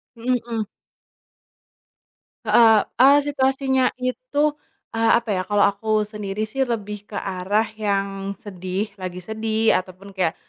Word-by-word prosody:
Mhm, 250 Hz, +2 st, 0 dB
mmm. 225 Hz, -2 st, -2 dB, 1.8 s
Heeh, 225 Hz, -2 st, +6 dB, 0.2 s
eee, 275 Hz, +3 st, +8 dB
situasinya 265 Hz, -2 st, +1 dB
itu, 290 Hz, -, 0 dB, 0.4 s
eee, 225 Hz, 0 st, +2 dB
apa 230 Hz, -2 st, -3 dB
ya, 185 Hz, -2 st, +1 dB
kalo 205 Hz, -1 st, +3 dB
aku 215 Hz, +2 st, +1 dB
sendiri 210 Hz, -1 st, -4 dB
sih 265 Hz, +5 st, -1 dB
lebih 210 Hz, -3 st, -4 dB
ke 210 Hz, -, -10 dB
arah 195 Hz, +3 st, 0 dB, 0.2 s
yang 195 Hz, -1 st, -2 dB
sedih, 190 Hz, +1 st, -4 dB
lagi 180 Hz, -1 st, -6 dB
sedih 220 Hz, +2 st, 0 dB
ataupun 185 Hz, +2 st, -11 dB
kayak 185 Hz, -4 st, -1 dB
215 Hz, 125 wpm, -22 LUFS, 195-235 Hz, 1.8 s, eee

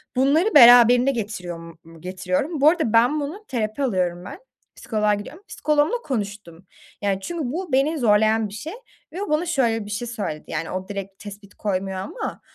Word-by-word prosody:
Bunları 300 Hz, +9 st, +2 dB
beraberinde 245 Hz, 0 st, +8 dB
getiriyor 200 Hz, -7 st, -5 dB
m 165 Hz, 0 st, -11 dB, 0.2 s
mu 165 Hz, -, -16 dB
getiriyorum. 185 Hz, -, -3 dB
Bu 300 Hz, -, +7 dB
arada 315 Hz, -10 st, 0 dB
ben 245 Hz, +7 st, +4 dB
bunu 345 Hz, +10 st, -6 dB
Terapi 230 Hz, +1 st, -3 dB
alıyorum 180 Hz, -6 st, -1 dB
ben. 280 Hz, -, -9 dB, 0.4 s
Psikoloğa 215 Hz, -4 st, 0 dB
gidiyorum. 290 Hz, -, -7 dB
Psikoloğumla 300 Hz, +8 st, 0 dB
konuştum. 200 Hz, -, -5 dB, 0.4 s
Yani, 195 Hz, -1 st, -1 dB
çünkü 310 Hz, -, -4 dB
bu 350 Hz, -1 st, -5 dB
beni 290 Hz, +5 st, +2 dB
zorlayan 220 Hz, -1 st, +3 dB
bir -, -, -12 dB
şey 310 Hz, -, -7 dB, 0.4 s
ve 375 Hz, -, -5 dB
o 410 Hz, -, -4 dB
bana 305 Hz, +3 st, +1 dB
şöyle 235 Hz, -9 st, 0 dB
bir -, -, -10 dB
şey 235 Hz, +4 st, -4 dB
söyledi. 200 Hz, -10 st, -5 dB
Yani, 165 Hz, 0 st, -3 dB
o 185 Hz, +1 st, -5 dB
direkt 195 Hz, -1 st, -7 dB
tespit 205 Hz, 0 st, -11 dB
koymuyor 190 Hz, -2 st, -3 dB
ama 310 Hz, -, -6 dB
225 Hz, 175 wpm, -22 LUFS, 195-290 Hz, 0.4 s, beraberinde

